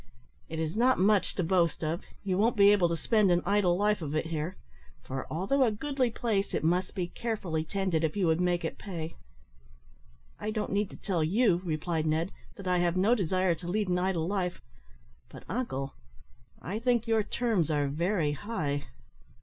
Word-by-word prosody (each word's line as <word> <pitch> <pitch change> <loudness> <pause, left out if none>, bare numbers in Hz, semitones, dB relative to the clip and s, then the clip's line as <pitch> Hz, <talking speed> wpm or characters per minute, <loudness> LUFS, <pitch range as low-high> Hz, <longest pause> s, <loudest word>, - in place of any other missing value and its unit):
It 160 - -5
is 160 +1 -2
not 250 +3 +4
much 200 +1 +3
to 185 - 0
boast 170 -2 +1
of. 160 +3 -1 0.2
You 190 -2 0
won't 220 +5 +2
be 200 0 +7
able 190 -4 +4
to 170 - -1
spend 215 +1 +3
an 175 0 +3
idle 200 -4 +3
life 210 0 +2
of 150 -1 -3
it 155 - 0
here; 160 +3 -3 0.5
for, 135 0 -5
although 195 - 0
a 245 - +4
goodly 265 +3 0
place, 220 -3 -1
it - - -1
must 180 +5 +1
be 180 -3 -2
carefully 190 -10 -2
tended 180 -1 -1
if 160 +5 0
you 195 - +2
would 160 +1 +2
make 175 -1 +1
it - - -4
pay." 165 -5 -5 1.3
"I 210 - -3
don't 215 -1 -2
need 200 0 0
to - - -11
tell 180 -6 -1
you," 185 +1 +3
replied 160 -1 -1
Ned, 160 +4 0 0.2
"that 195 - -8
I 180 -1 +2
have 175 0 +1
no 200 +6 +4
desire 185 -4 +1
to 170 +2 -8
lead 205 +2 0
an 180 0 +2
idle 180 -3 0
life. 185 -1 -2 0.7
But, - - -11
uncle, 135 - -3 0.7
I 190 - -4
think 240 -1 +2
your 225 -1 +2
terms 210 -7 0
are 145 -2 +1
very 165 +2 0
high." 145 -5 -3
185 Hz, 190 wpm, -29 LUFS, 160-210 Hz, 1.3 s, be